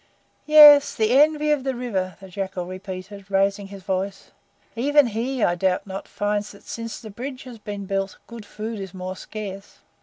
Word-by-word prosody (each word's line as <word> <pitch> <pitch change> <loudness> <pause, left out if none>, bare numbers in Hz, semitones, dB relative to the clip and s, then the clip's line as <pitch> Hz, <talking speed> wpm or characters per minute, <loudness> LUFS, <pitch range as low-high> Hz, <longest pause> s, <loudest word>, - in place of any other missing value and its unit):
"Yes, 295 -2 +9
the 220 0 +1
Envy 300 +3 +4
of 295 -3 +1
the 265 -1 -2
River," 190 -8 -3
the 195 - -11
Jackal 190 -1 -4
repeated, 190 +2 -8
raising 195 +1 +1
his 195 -1 -11
voice. 195 0 -3 0.4
"Even 290 +4 +4
he, 240 +2 -2
I 175 - +3
doubt 180 +1 0
not, 195 -1 -7
finds 205 0 -2
that 200 - -16
since 230 -1 -6
the 220 -3 -10
bridge 255 +5 -7
has 245 -4 -11
been 205 -2 -6
built 195 0 -2
good 235 -2 -10
food 215 +1 -6
is 190 -1 -7
more 185 0 -5
scarce. 200 -1 -8
205 Hz, 180 wpm, -23 LUFS, 195-245 Hz, 0.4 s, Yes